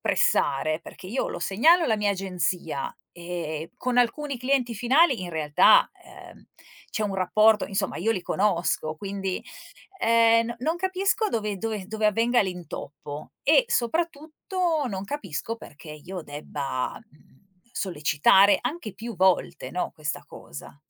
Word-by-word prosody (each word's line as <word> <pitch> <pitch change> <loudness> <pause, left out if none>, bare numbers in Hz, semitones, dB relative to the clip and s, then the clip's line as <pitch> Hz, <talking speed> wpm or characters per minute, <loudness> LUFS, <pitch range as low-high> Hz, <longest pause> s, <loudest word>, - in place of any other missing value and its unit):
pressare? 155 +4 +1
Perché 185 - -12
io 235 +7 -2
lo - - -5
segnalo 325 - +4
alla 225 -7 +2
mia 210 -1 +1
agenzia. 180 -6 -2 0.2
Ehm, 170 -2 -5
con 250 -1 -2
alcuni 265 +3 +1
clienti 250 -2 0
finali 260 - +3
in 175 - -5
realtà, 160 - +4
uhm, - - -14 0.5
c'è 215 - -2
un 205 -2 -2
rapporto 210 +4 +4
insomma 195 0 -2
io 220 +6 0
li 185 - -3
conosco, 175 -5 0
quindi, 195 +1 -4 0.6
ehm, 230 0 +4
no 235 - -4
non 315 +7 -1
capisco 380 +4 0
dove 210 - -2
dove 215 -2 -4
dove 215 0 -1
avvenga 230 +3 +3
l'intoppo, 160 -5 -7
e - - +5
soprattutto 320 - -1
non 195 -3 -4
capisco 220 - -4
perché 155 -5 -12
io 175 +4 -8
debba, 145 -3 -4
mhmm, 195 -8 -25 0.3
sollecitare 190 +3 +4
anche 245 - -4
più 230 +3 -7
volte, 185 0 +1
no, 180 - -2
questa 150 -2 -4
cosa. 70 - -11
205 Hz, 140 wpm, -25 LUFS, 175-245 Hz, 0.6 s, e